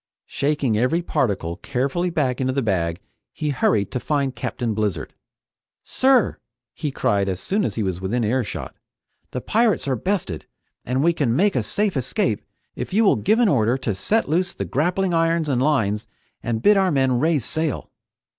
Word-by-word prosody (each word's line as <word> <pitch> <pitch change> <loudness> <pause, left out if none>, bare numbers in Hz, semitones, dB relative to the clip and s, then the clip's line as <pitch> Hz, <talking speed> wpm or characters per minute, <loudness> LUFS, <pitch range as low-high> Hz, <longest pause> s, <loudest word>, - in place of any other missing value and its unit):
Shaking 140 -6 0
every 160 +9 +1
particle 95 - -1
carefully 140 - -1
back 135 -7 0
into 130 0 0
the 135 0 0
bag, 85 -5 0 0.3
he 150 - -3
hurried 110 -7 +1
to 125 - -2
find 140 -1 -1
Captain 120 -4 -3
Blizzard. 105 -7 -2 0.7
"Sir!" 260 -3 +2 0.3
he 150 - -3
cried 100 -7 0
as 95 -1 -3
soon 205 - 0
as - - -2
he 110 - -1
was 95 -2 -2
within 115 +6 -1
earshot, 120 +1 -2 0.5
"the 125 - -4
pirates 220 - +1
are 135 - +1
bested, 170 - -2 0.4
and 130 +3 0
we 170 +1 +4
can 130 -8 0
make 195 +5 +2
a 125 - +2
safe 200 - 0
escape 120 -4 0 0.3
if - - -5
you 225 - +5
will 200 - +5
give 215 +2 +2
an 240 -2 +4
order 120 - +2
to 125 -5 -2
set 215 - 0
loose 175 +4 0
the - - -3
grappling 180 +5 0
irons 165 -1 +2
and 130 -4 +1
lines 110 -7 +1 0.3
and 115 -1 -2
bid 210 -1 +6
our 190 -1 +3
men 130 -5 +2
raise 155 -4 +1
sail!" 155 -4 -2
135 Hz, 180 wpm, -22 LUFS, 110-170 Hz, 0.7 s, bid